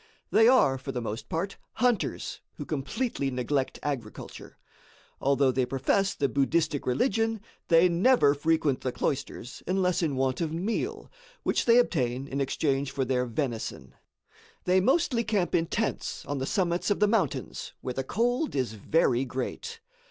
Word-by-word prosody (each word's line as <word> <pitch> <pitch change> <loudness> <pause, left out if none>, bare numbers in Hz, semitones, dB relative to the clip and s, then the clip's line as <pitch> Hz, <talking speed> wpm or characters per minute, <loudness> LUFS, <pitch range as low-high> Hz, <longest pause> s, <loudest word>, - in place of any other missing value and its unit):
They 225 +1 +6
are, 140 - +5
for 135 +1 -5
the 125 - -3
most 110 -1 -5
part, 185 +5 -2 0.2
hunters, 245 -4 0
who 145 - -6
completely 145 - -2
neglect 130 +2 -1
agriculture. 130 -7 -6 0.6
Although 140 -1 +3
they 130 0 +1
profess 135 +10 +1
the 140 - +1
Buddhistic 145 +3 0
religion, 225 - +1 0.3
they 170 +1 +6
never 175 - +4
frequent 150 -2 +1
the 130 - -1
cloisters 130 -1 -3
unless 185 -1 +1
in 155 -5 0
want 130 +2 0
of 160 -2 -1
meal, 185 +8 -3 0.3
which - - +1
they 235 0 +6
obtain 135 - +1
in 140 0 -2
exchange 135 0 0
for 135 -1 -2
their 125 -1 0
venison. 120 -2 -4 0.7
They 185 +1 +3
mostly 255 - +2
camp 205 -5 0
in 165 0 +2
tents 225 +6 -2
on 145 -1 -3
the 135 - -2
summits 175 0 0
of 205 - +1
the 210 - +4
mountains, 200 - -1
where 125 - -4
the 135 - -2
cold 245 - 0
is 125 -5 -1
very 120 +3 +2
great. 295 - -5
145 Hz, 155 wpm, -28 LUFS, 130-195 Hz, 0.7 s, They